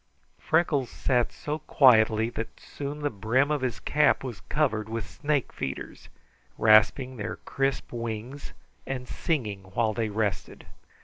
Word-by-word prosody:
Freckles 155 -6 +1
sat 125 -3 0
so 150 +1 -4
quietly 115 -7 +4
that 115 -1 -6
soon 145 +1 -6
the 145 - 0
brim 120 +7 +1
of 150 -2 0
his 125 -4 -2
hat 150 -2 +4
was 120 -9 -6
covered 110 -8 0
with 115 -3 -4
snake 150 -3 -1
feeders, 65 - -6 0.5
rasping 110 +4 +4
their 105 0 -4
crisp 135 0 -1
wings 115 +4 -5 0.3
and 125 -2 -4
singing 120 - -2 0.2
while 110 -2 +2
they 110 -1 -1
rested. 105 -2 -3
125 Hz, 135 wpm, -27 LUFS, 110-145 Hz, 0.5 s, quietly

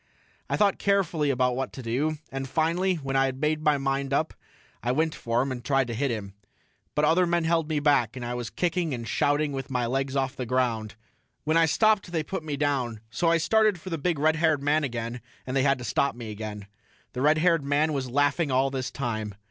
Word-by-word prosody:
I - - 0
thought 205 -2 +2
carefully 180 -7 +1
about 125 -2 +1
what 135 +1 -3
to 130 - -8
do, 140 +7 -1
and 135 0 -4
finally 170 +6 +1
when 135 -4 -4
I 135 0 +4
had 130 0 -5
made 155 +1 0
my 150 -1 +3
mind 135 0 -1
up 155 +3 +1 0.5
I 120 - 0
went 155 +4 +1
for 115 +1 0
him 135 - -3
and 120 -2 -5
tried 135 -1 +2
to - - -2
hit 135 +5 0
him. 105 -4 -4 0.6
But 150 - +3
other 175 +3 +3
men 170 0 +1
held 165 -1 +1
me 155 -2 +1
back, 140 -6 +2
and 125 -2 -5
I 120 - -3
was 120 -1 -4
kicking 170 -4 -1
and 115 -1 -6
shouting 145 +4 +1
with 135 -1 -5
my 125 -2 0
legs 135 +2 -1
off 135 -1 0
the 125 -2 -4
ground. 115 -4 0 0.5
When 155 +1 +1
I 165 0 +5
stopped 215 0 +2
they 160 -3 0
put 190 +4 -4
me 150 -2 -3
down, 130 -6 -1
so 170 +5 +1
I 170 - +4
started 215 +3 +3
for 185 +3 -8
the 165 - -2
big 170 +1 0
red 155 +2 +2
haired 155 -3 +2
man 150 +2 +2
again 120 -2 -4 0.2
and 130 - -4
they 135 - +3
had 135 0 +3
to 125 - -8
stop 135 +1 0
me 115 -3 -7
again. 105 -1 -6 0.5
The 125 - -3
red 150 +3 +4
haired 165 -1 +3
man 145 +3 +1
was 135 -3 -2
laughing 145 +4 +1
all 135 +1 +2
this 130 -2 -3
time. 110 -6 -4
140 Hz, 235 wpm, -26 LUFS, 125-160 Hz, 0.6 s, I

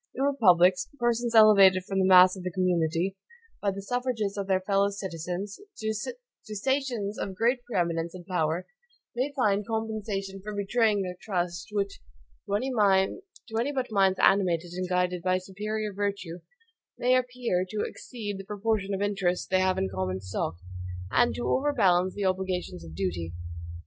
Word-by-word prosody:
In 265 - -1
republics, 190 -6 +4
persons 240 -1 0
elevated 200 -4 +7
from 195 +1 -2
the 190 - +3
mass 185 0 +8
of 190 - -8
the 180 - -3
community, 180 0 0 0.5
by 205 - +1
the 195 0 -5
suffrages 245 -3 -2
of 200 -1 -3
their 190 -1 +2
fellow 200 +1 +2
citizens, 190 0 -5 0.2
to 220 - -3 0.4
stations 240 -3 -1
of 190 - -4
great 240 +5 +1
pre 240 - -3
eminence 170 -1 -1
and 175 -1 -10
power, 170 -1 -1 0.5
may 260 +4 -1
find 205 -6 +1
compensations 215 -3 -3
for 210 +1 -6
betraying 205 0 +2
their 180 -1 -5
trust, 175 -3 -2
which, 200 -1 -2 0.5
to 200 - 0
any 230 - 0
but 260 -4 -3
minds 195 -2 +3
animated 175 -3 +3
and 185 0 -3
guided 180 -1 0
by 185 +1 +2
superior 210 +3 -4
virtue, 200 -4 -3 0.6
may 250 +1 +3
appear 245 -7 0
to 210 +2 -2
exceed 205 -5 -6
the - - -6
proportion 205 0 -1
of 195 - -2
interest 190 -4 -1
they 185 - +4
have 185 0 +2
in - - +1
the 95 - -6
common 95 0 -2
stock, 95 -3 -3 0.6
and 240 0 +3
to 240 - -3
overbalance 195 -11 +2
the 205 - -2
obligations 185 - -2
of 80 -1 -10
duty. 85 -2 -3
195 Hz, 160 wpm, -27 LUFS, 180-220 Hz, 0.6 s, mass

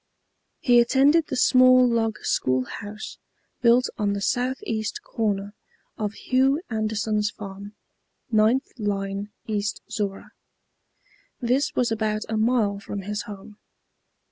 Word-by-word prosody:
He 245 -2 +5
attended 280 +6 +4
the - - -3
small 255 0 +6
log 225 -2 0
school 130 0 +1
house 210 +7 -8 0.4
built 245 +1 +5
on 205 -1 +1
the 200 - -2
south 250 +5 0
east 220 -2 -3
corner 205 -2 -2 0.4
of 210 -1 -3
Hugh 265 +5 +2
Anderson's 215 -1 0
farm, 200 0 -9 0.6
9th 220 +5 +3
line 200 -1 -2 0.2
East 210 -1 -2
Zorra. 200 -3 -4 1.1
This 255 +3 0
was 245 -2 +1
about 215 -1 -1
a 220 - -1
mile 215 -3 +1
from 200 0 -6
his 205 +1 -3
home. 205 +1 -10
215 Hz, 120 wpm, -24 LUFS, 205-245 Hz, 1.1 s, small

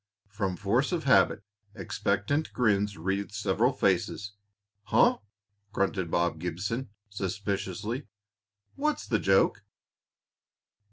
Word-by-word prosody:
From 95 -3 -2
force 120 - +1
of 170 -3 -1
habit, 100 -5 +4 0.3
expectant 105 - -1
grins 105 -4 +1
wreathed 95 +4 -2
several 105 +5 +2
faces. 100 -2 0 0.5
"Huh!" - - +4 0.5
grunted 95 -4 0
Bob 85 -1 0
Gibson, 95 +9 -3 0.2
suspiciously. 100 +4 -3 0.7
"What's 300 +2 -1
the 110 -4 +1
joke?" 95 +2 +3
100 Hz, 95 wpm, -28 LUFS, 95-115 Hz, 0.7 s, habit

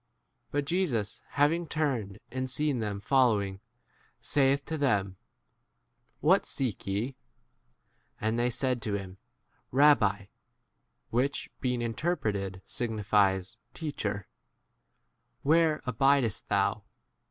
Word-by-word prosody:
But 145 0 -1
Jesus 140 - 0 0.2
having 160 +4 +3
turned, 130 -11 -1
and 130 0 -3
seeing 145 0 +1
them 105 -2 -3
following, 105 -5 +2 0.6
saith 140 0 +2
to 160 - -3
them, 100 -10 +1 1.0
What - - +4
seek 125 -10 -2
ye? 110 +7 -2 1.0
And 110 +2 0
tlwy 120 +1 +2
said 125 0 0
to 105 -1 -1
him, 95 -1 -6 0.5
Rabbi, 120 -8 +4 0.9
(which, 130 +4 0
being 125 -2 -1
interpreted, 105 - -2
signifies 105 -3 0 0.2
Teach 155 -3 -4
39 100 -1 0
er,) - - -26 1.2
where 160 +1 +3
abidest 125 -2 +2
thou - - +1
120 Hz, 105 wpm, -29 LUFS, 100-140 Hz, 1.2 s, What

